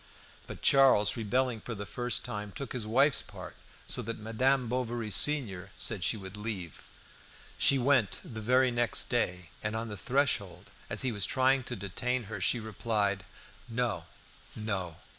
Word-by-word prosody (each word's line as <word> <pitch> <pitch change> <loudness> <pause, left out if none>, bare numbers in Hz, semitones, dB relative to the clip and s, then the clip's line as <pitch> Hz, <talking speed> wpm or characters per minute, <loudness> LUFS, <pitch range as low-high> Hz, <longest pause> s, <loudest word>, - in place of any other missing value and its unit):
But - - -9
Charles, 130 -7 +6
rebelling 120 +1 0
for 115 - -6
the 100 0 -6
first 120 +4 -2
time, 105 -4 -5
took 140 +7 -6
his 120 -4 -3
wife's 135 +5 +4
part, - - -10 0.3
so - - 0
that 115 +1 -5
Madame 125 +4 +1
Bovary, 120 -2 -2
senior, 100 - +3
said - - 0
she - - +1
would 95 -1 -8
leave. 105 -6 -6 0.7
She 140 - +5
went 130 -4 +2
the 110 -2 -7
very 125 +3 +3
next 120 -1 0
day, 90 -8 -1
and 105 +1 -2
on 115 0 -3
the 105 - -6
threshold, 100 -7 0 0.2
as - - 0
he 130 - 0
was 100 -3 0
trying 130 0 +3
to - - -4
detain 120 +6 -2
her, 100 -2 -6
she 115 +6 +3
replied 105 -2 -1 0.4
"No, 120 +1 -2 0.5
no! 95 -6 -3
115 Hz, 160 wpm, -30 LUFS, 100-125 Hz, 0.7 s, Charles